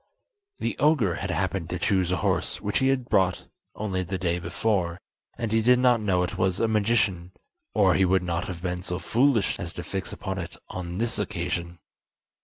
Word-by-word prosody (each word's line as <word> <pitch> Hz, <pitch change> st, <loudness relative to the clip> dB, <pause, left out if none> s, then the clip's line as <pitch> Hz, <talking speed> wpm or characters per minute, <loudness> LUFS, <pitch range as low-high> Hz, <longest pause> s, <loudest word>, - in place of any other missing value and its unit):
The -, -, -2 dB
ogre 145 Hz, -, +3 dB
had 100 Hz, -, -4 dB
happened 90 Hz, 0 st, -1 dB
to 90 Hz, -, -2 dB
choose 95 Hz, 0 st, +1 dB
a -, -, +2 dB
horse -, -, 0 dB
which 105 Hz, 0 st, 0 dB
he 130 Hz, -, +2 dB
had 130 Hz, -2 st, +1 dB
bought 90 Hz, -2 st, +2 dB, 0.3 s
only 100 Hz, -3 st, -2 dB
the 95 Hz, +1 st, -3 dB
day 90 Hz, -1 st, 0 dB
before, 90 Hz, 0 st, -1 dB, 0.4 s
and 115 Hz, -2 st, -2 dB
he 110 Hz, 0 st, +3 dB
did 125 Hz, +3 st, +5 dB
not 125 Hz, -2 st, +4 dB
know 95 Hz, -4 st, +2 dB
it 90 Hz, -, -4 dB
was 95 Hz, 0 st, +1 dB
a 115 Hz, -, +2 dB
magician, 100 Hz, -5 st, +1 dB, 0.4 s
or 95 Hz, -3 st, +5 dB
he 95 Hz, -, +3 dB
would 95 Hz, 0 st, +3 dB
not 85 Hz, 0 st, -1 dB
have 90 Hz, -2 st, -7 dB
been 90 Hz, -1 st, -2 dB
so 90 Hz, -1 st, -3 dB
foolish 120 Hz, +1 st, +2 dB
as 85 Hz, -1 st, -5 dB
to 85 Hz, -, -6 dB
fix 95 Hz, -1 st, -4 dB
upon 95 Hz, 0 st, -4 dB
it 85 Hz, -, -7 dB
on 90 Hz, -1 st, -5 dB
this 115 Hz, +2 st, -1 dB
occasion. 85 Hz, -2 st, -3 dB
95 Hz, 200 wpm, -26 LUFS, 90-110 Hz, 0.4 s, did